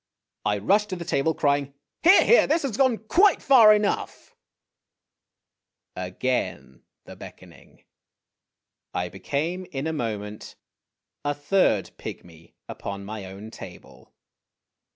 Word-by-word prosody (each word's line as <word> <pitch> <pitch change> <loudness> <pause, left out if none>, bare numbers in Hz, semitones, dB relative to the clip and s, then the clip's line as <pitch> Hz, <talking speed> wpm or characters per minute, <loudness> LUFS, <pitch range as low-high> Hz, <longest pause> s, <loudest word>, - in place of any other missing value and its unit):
I 105 -1 +1
rushed 205 - +1
to 185 - -3
the 170 -1 -7
table, 160 +2 0
crying, 140 -1 0
" - - -60
Here! 365 +4 +6
here! 475 - +5
this 320 +2 +1
has 260 -7 -3
gone 260 -3 +2
quite 390 - +4
far 235 -6 +7
enough! 210 -1 -1 0.8
' - - -61
Again 90 - -3 0.2
the - - -11
beckoning. - - -15 1.1
I 90 0 -2
became 155 - -3
in 135 0 -4
a 160 - -2
moment 105 -6 -5 0.7
a 145 0 -1
third 165 +7 +1
pygmy 85 -1 -11
upon 100 0 -7
my 105 -1 -7
own 100 +4 -10
table. - - -13
145 Hz, 125 wpm, -24 LUFS, -, 1.1 s, far